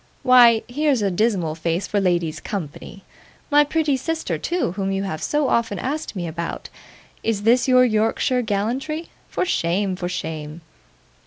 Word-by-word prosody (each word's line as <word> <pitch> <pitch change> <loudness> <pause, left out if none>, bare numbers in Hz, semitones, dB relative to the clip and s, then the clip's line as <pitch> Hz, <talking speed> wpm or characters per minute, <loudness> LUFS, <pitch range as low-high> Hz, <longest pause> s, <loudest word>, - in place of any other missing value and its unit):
Why, 240 -3 +6
here's 275 -2 +1
a 200 - +1
dismal 185 -5 0
face 165 +3 -2
for 205 - 0
ladies' 175 -4 0
company! 195 +1 -7 0.5
my 295 +1 +6
pretty 300 -1 +1
sister 320 +5 -3
too, 350 - -1
whom 195 +1 -2
you 195 0 -1
have 160 -6 -4
so 295 -2 0
often 225 -5 0
asked 285 - -4
me 180 -2 -3
about. 170 +1 -5 0.5
Is 215 -3 -1
this 240 +4 +4
your 255 -1 +6
Yorkshire 225 +3 +1
gallantry? 245 +10 -2 0.2
For - - -1
shame! 190 - 0
for 180 -1 -4
shame! 160 -2 -5
215 Hz, 155 wpm, -22 LUFS, 180-255 Hz, 0.5 s, Why